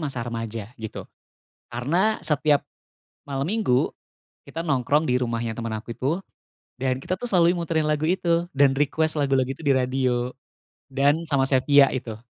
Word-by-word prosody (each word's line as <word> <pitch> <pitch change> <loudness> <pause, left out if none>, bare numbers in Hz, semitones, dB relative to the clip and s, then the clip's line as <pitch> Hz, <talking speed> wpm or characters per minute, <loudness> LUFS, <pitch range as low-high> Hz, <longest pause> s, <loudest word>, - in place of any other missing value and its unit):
masa 135 -6 -3
remaja, 115 -2 -4 0.2
gitu, 110 -1 -6 0.7
karena 170 - +1
setiap 150 -1 +2 0.6
malam 140 +3 -3
minggu 205 - +1 0.6
kita 165 - -5
nongkrong 150 0 +1
di 125 - +2
rumahnya 115 -2 -2
teman 115 -1 -4
aku 115 - -9
itu 155 +8 -1 0.6
dan 130 0 0
kita, - - -2
tuh, 245 - -4
selalu 175 -4 +4
muterin 165 -2 0
lagu 150 +1 0
itu 170 -1 +1
dan 140 0 +5
request 155 +2 +1
lagu-lagu 135 -2 +1
itu 135 - -9
di 140 - +4
radio, 125 -1 0 0.6
"Dan" 145 +4 +1
sama 140 -3 +2
"Sephia" 140 +1 +5
itu. 120 -4 -5
140 Hz, 150 wpm, -24 LUFS, 125-160 Hz, 0.7 s, dan